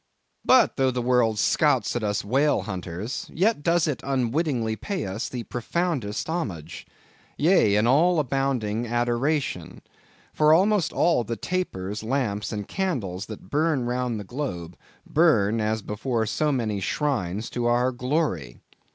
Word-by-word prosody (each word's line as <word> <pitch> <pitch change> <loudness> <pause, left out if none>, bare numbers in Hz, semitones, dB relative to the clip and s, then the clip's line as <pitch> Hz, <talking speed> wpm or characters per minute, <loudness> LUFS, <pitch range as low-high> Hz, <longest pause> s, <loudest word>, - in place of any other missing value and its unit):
But, 255 -1 +4
though 135 -1 +3
the 125 -1 -2
world 120 -3 +2
scouts 135 -2 +2
at 120 - -1
us 105 -1 -1
whale 135 +7 +2
hunters, 95 - -5
yet 200 0 +1
does 170 +1 +2
it 140 -6 -2
unwittingly 130 -3 0
pay 195 - -4
us 100 +5 -4
the 125 -2 -5
profoundest 125 - -2
homage; 100 - -4 0.5
yea, 150 - +4
an 105 +2 +3
all 165 +8 +4
abounding 125 -5 -1
adoration! 120 - -1 0.5
for 155 0 +4
almost 195 -1 +2
all 165 -8 +2
the 115 +1 -4
tapers, 105 - -3
lamps, 110 -3 -2
and 105 -2 -4
candles 120 - -3
that 105 -3 -10
burn 150 -4 +1
round 125 -2 -1
the - - -6
globe, 90 - -5 0.3
burn, 115 -10 +3
as 110 0 -1
before 115 +2 -2
so 150 +7 0
many 110 -6 -1
shrines, 110 - -1
to 120 -1 -1
our 120 +2 +2
glory! 125 - -2
120 Hz, 145 wpm, -25 LUFS, 105-150 Hz, 0.5 s, But